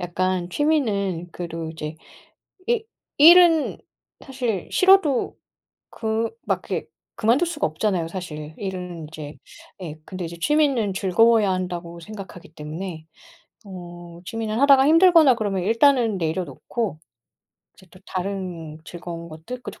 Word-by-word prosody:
약간 180 0 -1
취미는 200 - 0
그래도 165 -2 -5
이제 155 -1 -6 0.7
이 470 -2 +1 0.3
일은 330 0 +7 0.5
사실 245 - -3
싫어도 370 -9 +4 0.6
그 220 0 -2 0.2
막 - - 0
이렇게 - - -2 0.3
그만둘 245 +10 +2
수가 320 -3 -1
없잖아요, 165 +1 -1
사실은. 155 -4 -7
일은 180 -3 -5
인제 155 -1 -9 0.5
예, 155 -3 -6
근데 185 0 -6
이제 170 +1 -7
취미는 265 - +2
즐거워야 210 +2 +3
한다고 175 -2 -4
생각하기 190 -4 -10
때문에 160 +2 -7 0.6
어, 175 -3 -10
취미는 225 +1 -3
하다가 275 -1 +6
힘들거나 330 -4 +6
그러면 195 -4 -2
일단은 230 -1 +3
내려놓고 165 - -3 0.8
이제 190 - -19
또 185 - -17
다른 180 -5 -5
즐거운 170 -1 -8
것들 165 +11 -8
그리고 - - -9
190 Hz, 290 characters per minute, -23 LUFS, 170-240 Hz, 0.8 s, 일은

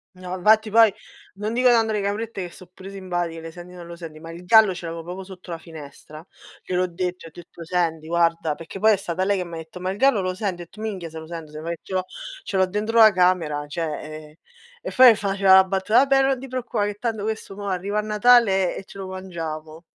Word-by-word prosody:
No, 185 0 -6
infatti 215 +3 +3
poi, 225 -2 +6 0.4
non 210 +3 -3
dico 250 +1 +3
tanto 225 -2 +3
le 210 -1 -1
caprette 200 -1 -3
che - - -15
so' 185 - -14
pure 190 +1 -11
simpatiche, 175 -4 -4
le 165 0 -8
senti 175 +2 -12
non 175 -1 -10
lo 170 0 -9
senti, 165 -3 -10
ma 165 +1 -9
il 170 +2 -11
gallo 215 0 +6
ce 175 -1 -8
l'avevo 165 0 -6
proprio 180 +3 -7
sotto 185 -2 -11
la 165 - -5
finestra. 155 -1 -12 0.4
Gliel'ho 185 0 0
detto, 180 0 -4
ho - - -11
detto: 170 0 -12
"Senti 165 -2 -1
guarda". 165 -2 +1
Perché 165 +5 -9
poi 220 +2 +5
è - - +4
stata 180 0 -3
lei 200 +1 +1
che 185 - -2
m'ha 170 -1 -8
detto: 160 +2 -9
"Ma 185 +1 -2
il 195 - -6
gallo 270 -4 +3
lo 185 0 -2
senti?" 195 -1 -2
Ho - - -12
detto: 215 +6 -14
"Minchia 195 -6 -4
se 160 - -7
lo 160 - -10
sento, 165 -2 -8
sembra 155 +2 -6
che 170 - -9
ce - - -9
l'ho 185 0 +1 0.4
ce 195 - -3
l'ho 190 - +4
dentro 210 +4 -2
la 220 -1 +9
camera, 170 -6 +1
cioè 165 +2 -3 0.5
eh" - - -30 0.4
E - - -5
fa-faceva 200 -6 +5
la 190 0 +9
battuta: 195 +4 +2
"Vabbè 275 0 +4
non 270 -1 +1
ti 270 - -8
preoccupa 245 -4 -2
che 205 0 -3
tanto 220 -1 -3
questo 215 -2 -4
mo' 200 0 -6
arriva 195 +2 -1
a - - +1
Natale 210 -3 +4
e - - -8
ce - - -13
lo 195 -1 -6
mangiamo." 165 -4 -7
185 Hz, 245 wpm, -23 LUFS, 170-210 Hz, 0.5 s, la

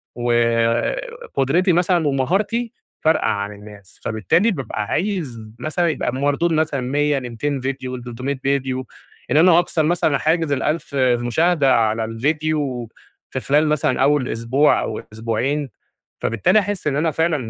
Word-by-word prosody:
وقُدرتي 130 - +1
مثلًا، 175 -2 +2
ومهارتي 200 - 0 0.3
فارقة 160 +1 +3
عن 100 0 -1
الناس. 105 -1 -14
فبالتالي 110 - +1
بابقى 135 - -3
عايز 165 - -2 0.2
مثلًا 155 +5 0
يبقى 150 - -1
المردود 145 +6 0
مثلًا 155 -3 0
100 145 +3 +1
ل200 130 +3 -3
فيديو 130 -1 -4
ل300 125 +3 -5
فيديو. 135 -2 -1 0.5
إن - - +4
أنا 170 +1 +6
أكسر 170 -2 0
مثلًا 155 -3 +2
حاجز 160 -1 +1
ال1000 150 +1 -1
مشاهدة 130 +4 +2
على 110 -1 +1
الفيديو 140 0 -1 0.4
في - - -3
خلال 150 +3 +2
مثلًا 150 -3 +1
أول 140 -2 +2
أسبوع، 120 +6 +2
أو 110 - -4
أسبوعين، 120 +6 -2 0.5
فبالتالي 115 - +2
أحِسْ 205 -3 -2
إن 140 -2 +1
أنا 160 +2 +1
فعلًا 160 +2 +1
140 Hz, 135 wpm, -20 LUFS, 120-160 Hz, 0.5 s, أنا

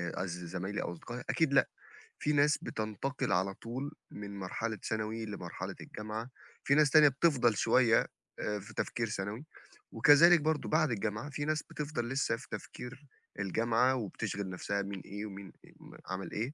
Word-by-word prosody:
قصدي 90 -1 -4
زمايلي 95 +4 -3
أو - - -3
أصدقائي؟ 120 +9 -7
أكيد 160 -5 +2
لأ، - - +5 0.5
فيه 150 - +1
ناس 150 +1 +4
بتنتقل 110 +4 -2
على 95 +1 +2
طول 130 +8 -5 0.2
من 100 -1 -7
مرحلة 110 +4 -3
ثانوي 110 +1 -2
لمرحلة 105 -2 -6
الجامعة، 110 +3 -6 0.3
فيه 140 - +4
ناس 150 -1 +5
تانية 155 0 +8
بتفضَل 130 -5 +3
شوية 120 0 +4 0.5
في 105 +3 -11
تفكير 115 -2 -1
ثانوي، 105 +7 -4 0.5
وكذلك 165 +3 +7
برضُه 155 0 0
بعد 155 -3 +3
الجامعة 110 +4 -2
فيه 145 0 -3
ناس 155 0 0
بتفضَل 145 -6 -4
لسه 135 -3 +1
في 130 - -12
تفكير 135 +4 -8 0.3
الجامعة، 115 +6 +2
وبتشغل 100 -3 -3
نفْسها 100 +2 -2
مين 100 -1 -5
إيه 105 +2 -5
ومين 100 -3 -8 0.6
عَمَل 95 0 -4
إيه، 120 +7 -2
115 Hz, 150 wpm, -32 LUFS, 100-140 Hz, 0.6 s, تانية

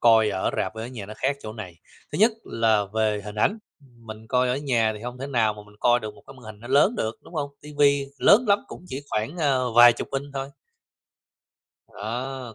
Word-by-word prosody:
coi 110 -2 +5
ở 95 -1 -1
rạp 95 - -2
ở 110 +1 -5
nhà 120 -5 -8
nó 110 - -8
khác 140 +2 0
chỗ 110 - -6
này. 95 -6 -9 0.4
Thứ - - -3
nhất 220 +3 +5
là 110 -2 +2
về 110 -1 +1
hình 105 -1 -7
ảnh, 200 - +1 0.2
mình 115 -4 -13
coi 125 +2 +2
ở 125 - +1
nhà 120 -6 +1
thì 105 - -11
hông 125 +1 -6
thể 135 - -5
nào 115 -6 +1
mà 105 - -11
mình 105 0 -19
coi 120 0 +4
được 110 -1 -6
một - - -18
cái 135 - -12
màn 130 - -16
hình 110 -1 -10
nó 120 - -10
lớn 145 - +4
được, 110 +1 -2
đúng - - -15
hông? 145 -2 -2
Tivi 145 -1 +2
lớn 225 +5 +6
lắm 200 0 +5
cũng - - -11
chỉ 135 +2 -5
khoảng, 110 +9 -2
a, 140 -4 +2 0.2
vài 120 0 +9
chục - - -6
inch 135 +1 -3
thôi. 135 0 -3 1.6
Á, 130 -1 -5
120 Hz, 230 wpm, -25 LUFS, 110-140 Hz, 1.6 s, vài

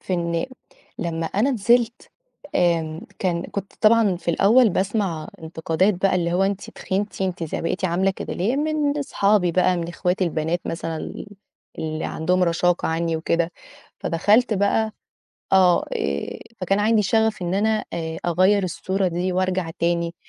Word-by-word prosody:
في 185 - -5
إن 170 -1 -1
م - - -1 0.5
لمّا 165 -1 -2
أنا 215 +11 +1
نزلت 235 0 +1 0.4
آمم 165 -2 +1 0.2
كان 175 -3 0
كنت 200 -1 -6
طبعًا 215 -3 +4
في 175 - -9
الأول 220 +7 +5
باسمع 190 -5 -1
انتقادات 165 +4 0
بقى 190 +2 +1
اللي 170 -1 0
هو 180 +2 +2
أنتِ 195 0 -2
تخنتِ، 200 +1 -3
أنتِ 185 -2 -2
ز 155 - -7
بقيتِ 185 +3 -2
عاملة 185 +2 +2
كده 190 - -6
ليه؟! 220 +10 0
من 300 -1 0
أصحابي 200 -9 +2
بقى، 180 +1 +3
من 170 -1 -3
إخواتي 180 +2 0
البنات 165 +1 -1
مثلًا 165 -1 -4
ال - - -7 0.5
اللي 155 0 -3
عندهم 180 +3 0
رشاقة 175 0 +1
عنّي 165 0 0
وكده، 170 +1 0 0.5
فدخلت 215 +8 +2
بقى 210 +2 +1 0.6
آه، 185 -2 +5
آآ 70 0 -2 0.2
فكان 195 +2 +1
عندي 215 +1 +3
شَغَف 220 +1 +1
إن 175 +1 -1
أنا 215 +2 +1
آآ 160 -1 -4
أغيّر 185 +4 +3
الصورة 190 +2 -1
دي 180 +2 -2
وأرجع 185 -2 0
تاني 170 0 0
185 Hz, 155 wpm, -23 LUFS, 170-205 Hz, 0.6 s, الأول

